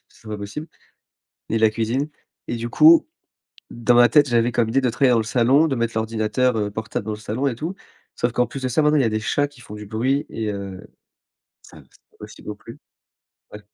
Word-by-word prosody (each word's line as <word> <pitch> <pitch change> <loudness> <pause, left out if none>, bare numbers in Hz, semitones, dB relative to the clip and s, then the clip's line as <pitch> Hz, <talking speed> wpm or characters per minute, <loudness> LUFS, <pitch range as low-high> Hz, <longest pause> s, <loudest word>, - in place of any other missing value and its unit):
c'est 110 - -17
pas 105 - -4
possible, 105 +11 -7 0.8
ni 115 - +1
la 110 0 +5
cuisine 115 +6 -1 0.4
et - - -2
du 115 +1 -4
coup 315 - +6 0.6
dans 120 +1 +1
ma 120 0 +6
tête, 145 +3 +4
j'avais 120 0 +2
comme 115 -1 +1
idée 135 +4 +2
de 125 - +1
travailler 130 +1 +3
dans - - +4
le - - 0
salon, 125 +7 +3
de 140 - -1
mettre 115 -1 -1
l'ordinateur, 110 +2 0
heu, 105 -1 -1
portable 110 +1 -5
dans 110 - -3
le - - -6
salon 115 +6 -2
et 125 - -1
tout. 160 +9 -4 0.4
Sauf 120 - -1
qu'en 125 +1 +1
plus 135 - -7
de - - 0
ça 125 +5 +1
maintenant, 150 0 +3
il - - +4
y 125 - +2
a - - +2
des 110 0 -1
chats 145 +6 0
qui 145 -4 -18
font 105 - -10
du 105 0 -9
bruit 130 +7 0
et 110 -2 -3
heu, 100 -2 -6 0.8
ça - - -15
c'est - - -25
pas - - -29
possible - - -12
non - - -4
plus. - - -13 0.7
Ouais. 105 - -9
120 Hz, 235 wpm, -22 LUFS, 110-135 Hz, 0.8 s, coup